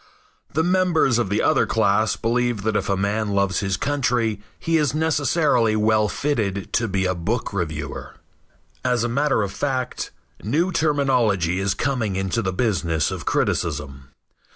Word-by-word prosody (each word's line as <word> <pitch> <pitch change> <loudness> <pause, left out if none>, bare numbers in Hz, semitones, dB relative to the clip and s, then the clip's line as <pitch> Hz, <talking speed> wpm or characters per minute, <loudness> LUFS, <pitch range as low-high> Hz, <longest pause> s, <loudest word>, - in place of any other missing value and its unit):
The 160 - +2
members 175 -8 +2
of 115 - 0
the 100 - 0
other - - +3
class 110 0 +2
believe 120 -2 0
that 110 0 0
if - - -1
a 100 - +1
man 100 +2 -1
loves 100 -1 +1
his 95 -2 -1
country 125 -7 0 0.2
he 165 -1 +1
is 150 -2 +1
necessarily 150 -7 +2
well 110 0 +2
fitted 105 -10 -2
to 115 - +1
be 95 -1 0
a 95 - +1
book 100 +7 -3
reviewer. 80 -6 -4 0.7
As 125 -2 +1
a - - +1
matter 135 -1 +1
of 100 - -3
fact, 130 +4 -2 0.3
new 160 - 0
terminology 125 - +1
is 95 0 0
coming 120 -8 -1
into 95 +4 -1
the 95 -3 -1
business 90 - 0
of - - -6
criticism. 70 -4 -1
110 Hz, 155 wpm, -22 LUFS, 95-135 Hz, 0.7 s, other